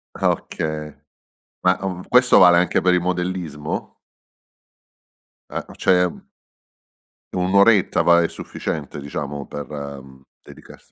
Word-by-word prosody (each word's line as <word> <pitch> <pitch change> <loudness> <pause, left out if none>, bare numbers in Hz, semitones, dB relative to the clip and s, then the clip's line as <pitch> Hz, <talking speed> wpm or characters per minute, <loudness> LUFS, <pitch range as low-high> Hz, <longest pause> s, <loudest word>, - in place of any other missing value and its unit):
Ah, - - +2
okay. 75 -1 -5 0.7
Ma, 90 0 +3
uhm, 90 -2 -4
questo 125 0 +5
vale 90 -2 +7
anche 90 -1 +2
per 90 - +3
il 90 - +3
modellismo? 90 -4 -4 1.6
Eh - - -2
ma - - -13
c'è 90 -1 +3
un 90 - -6 1.2
1 90 +1 -1
oretta 100 0 +4
va, 85 0 +5
è - - +1
sufficiente 75 -3 -6
diciamo 70 0 -6
per, 75 +1 -8
ehm, 70 -2 -8 0.2
dedicarsi - - -16
85 Hz, 125 wpm, -21 LUFS, 75-90 Hz, 1.6 s, vale